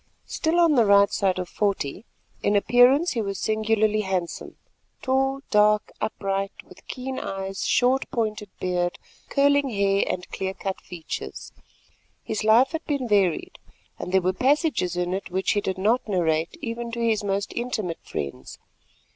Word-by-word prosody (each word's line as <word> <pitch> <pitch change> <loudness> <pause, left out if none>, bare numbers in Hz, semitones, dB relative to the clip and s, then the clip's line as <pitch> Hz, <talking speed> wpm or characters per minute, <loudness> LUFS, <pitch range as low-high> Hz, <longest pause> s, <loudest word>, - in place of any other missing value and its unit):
Still 330 +2 0
on 335 -2 +5
the 240 -5 +4
right 200 0 +6
side 190 -2 +1
of 180 -1 -3
forty, 200 -1 -2 0.4
in 205 - +1
appearance 250 - +5
he 230 - -1
was 200 -2 -3
singularly 215 0 +1
handsome; 185 -4 -3 0.5
tall, 270 +1 +1
dark, 210 0 +3
upright, 195 -2 -2 0.2
with - - -17
keen 260 0 -5
eyes, 195 0 -4
short 255 +2 +2
pointed 215 -3 -2
beard, 180 -1 -1 0.3
curling 285 0 +3
hair 200 -2 +2
and 180 0 -3
clear 190 0 -3
cut 190 -1 -4
features. 175 -3 -7 0.7
His 215 - -3
life 225 +5 +5
had 325 0 -4
been 280 -4 -1
varied, 195 -6 +1 0.4
and - - -5
there 190 -1 +3
were 185 +1 +1
passages 260 - +1
in 180 0 -1
it 190 0 -4
which 190 +1 0
he 205 - +1
did 190 -1 -3
not 220 +7 +1
narrate 165 -5 0
even 235 0 -4
to 235 - -3
his 225 -2 +1
most 200 0 -2
intimate 215 -8 -3
friends. 70 -2 -6
210 Hz, 155 wpm, -24 LUFS, 190-245 Hz, 0.7 s, right